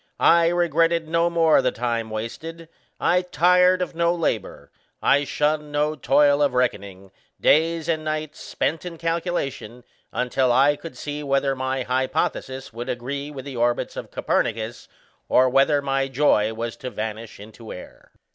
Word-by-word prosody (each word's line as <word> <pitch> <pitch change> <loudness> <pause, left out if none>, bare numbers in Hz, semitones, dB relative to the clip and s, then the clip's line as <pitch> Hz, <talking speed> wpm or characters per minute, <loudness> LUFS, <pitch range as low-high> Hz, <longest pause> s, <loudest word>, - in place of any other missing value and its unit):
I 170 0 +5
regretted 165 -1 +1
no 170 +1 +2
more 165 -4 +4
the 130 -1 +1
time 115 -2 -2
wasted; 160 +10 -7 0.3
I 180 +2 +2
tired 180 +1 +3
of 180 - -6
no 170 +1 +1
labour; 120 - -3 0.3
I 145 +1 +3
shunned 150 +1 -1
no 150 +1 0
toil 145 0 +3
of 140 -3 +2
reckoning, 100 -6 -2 0.3
days 165 +1 +2
and 160 -2 -1
nights 155 0 -4
spent 160 +1 -2
in 175 -2 -7
calculation, 165 -8 -3 0.3
until 125 0 0
I 135 +4 +4
could 165 +2 -10
see 145 0 -5
whether 140 -1 0
my 130 0 -2
hypothesis 130 0 -2
would 120 +3 -6
agree 140 +4 -4
with 140 -3 -8
the 135 -3 -7
orbits 120 0 0
of - - -7
Copernicus, 110 +1 -2 0.4
or 130 - +5
whether 140 +2 +3
my 135 -1 0
joy 130 -6 +2
was 115 +1 -5
to 130 - -6
vanish 110 -1 -6
into 110 +2 -11
air." 90 - -12
140 Hz, 155 wpm, -23 LUFS, 125-165 Hz, 0.4 s, I